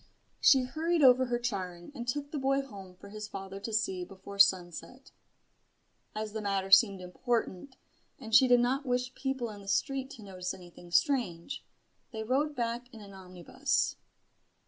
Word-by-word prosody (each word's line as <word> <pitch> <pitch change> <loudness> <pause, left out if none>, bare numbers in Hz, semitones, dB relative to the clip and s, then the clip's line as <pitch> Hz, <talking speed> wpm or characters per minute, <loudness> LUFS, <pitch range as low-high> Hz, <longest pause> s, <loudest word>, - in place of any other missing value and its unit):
She 265 -2 +6
hurried 320 +5 0
over 260 0 +7
her 240 0 0
charing, 190 -6 -4
and 240 -3 -7
took 285 +3 -3
the 295 - -3
boy 275 +1 +1
home 195 -8 -11
for 200 +2 -13
his 210 0 -7
father 195 -1 -7
to 225 - -6
see 195 -4 0
before 195 +2 -11
sunset. 195 +7 +2 1.0
As 215 -1 -4
the 220 - -3
matter 195 -2 -1
seemed 195 -1 +6
important, 230 +4 -3 0.4
and 225 0 -9
she 260 - +8
did 245 -1 +5
not 260 +4 +1
wish 250 -1 -1
people 265 -4 -3
in 205 -1 -10
the 195 - -14
street 265 +7 0
to 225 - -12
notice 185 -2 -5
anything 175 -1 -14
strange, 235 - 0 0.5
they 220 -2 -4
rode 285 +6 0
back 240 0 -3
in 225 - -11
an 200 -2 -12
omnibus. 190 +9 -2
220 Hz, 170 wpm, -30 LUFS, 195-260 Hz, 1.0 s, she